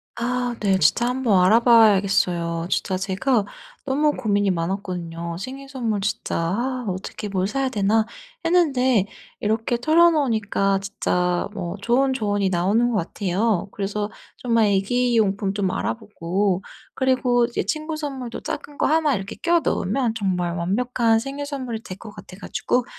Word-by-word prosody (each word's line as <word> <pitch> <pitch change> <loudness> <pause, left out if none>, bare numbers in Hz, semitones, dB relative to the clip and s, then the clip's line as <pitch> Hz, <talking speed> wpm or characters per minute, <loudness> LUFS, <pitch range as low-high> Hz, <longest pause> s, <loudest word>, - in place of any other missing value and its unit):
아 245 0 -1
네. 195 -2 +2
진짜 190 +8 +3
한번 245 -7 +2
알아봐야겠어요. 195 -6 +4
진짜 185 -1 0
제가 200 +4 0 0.4
너무 295 +2 +2
고민이 205 -6 +1
많았거든요. 170 -2 -4
생일 270 +6 -7
선물 230 -6 -2
진짜 200 0 -2
'아 240 +9 -1
어떻게 190 +2 -5
뭘 190 -1 0
사야 270 +3 -1
되나?' 215 -1 +2 0.4
했는데 260 - +3 0.3
이렇게 220 +3 0
털어놓으니까 245 - +3
진짜 180 -3 -1
뭐 175 -3 -4
좋은 260 +5 +2
조언이 205 -5 0
나오는 200 +7 +2
것 220 - 0
같아요. 195 +3 -1
그래서 205 +1 -3 0.3
정말 230 -3 +2
애기 230 +5 +1
용품 200 -2 +1
좀 195 -2 0
알아보고 195 -3 -1 0.3
그리고 250 -2 +2
이제 240 - -2
친구 310 0 -2
선물도 265 -6 -5
작은 290 - -6
거 - - +1
하나 310 -2 +3
이렇게 195 0 -5
끼워 340 -1 +2
넣으면 230 +4 0
정말 180 -5 -1
완벽한 225 +6 +1
생일 275 +4 -4
선물이 255 -6 -4
될 185 - -8
것 215 0 -10
같아 185 -2 -12
가지고 245 +3 -1
215 Hz, 320 characters per minute, -23 LUFS, 195-250 Hz, 0.4 s, 알아봐야겠어요